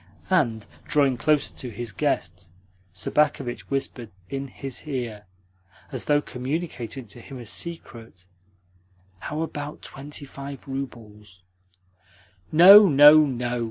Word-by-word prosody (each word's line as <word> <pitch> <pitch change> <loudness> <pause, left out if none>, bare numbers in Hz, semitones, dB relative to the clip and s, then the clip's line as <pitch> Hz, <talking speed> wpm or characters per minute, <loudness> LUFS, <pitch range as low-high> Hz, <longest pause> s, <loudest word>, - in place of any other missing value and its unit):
And, 120 - +1 0.2
drawing 140 -3 +2
closer 150 +3 +1
to 125 - -7
his 115 +1 -6
guest, 95 - -2 0.4
Sobakevitch 135 +6 -1
whispered 135 -4 -3 0.2
in 135 0 -4
his 135 +2 -7
ear, 115 -7 -5 0.6
as 130 -4 -5
though 145 0 +2
communicating 130 -2 -5
to 115 +3 -10
him 135 +2 -10
a 120 - -9
secret: 115 - -8 0.9
"How 150 +8 -5
about 150 -2 -6
twenty 140 +1 -8
five 140 +1 -9
roubles?" 105 -8 -8 1.1
"No, 195 +5 +9
no, 150 +1 +8
no!" 125 -2 -3
135 Hz, 115 wpm, -24 LUFS, 115-150 Hz, 1.1 s, No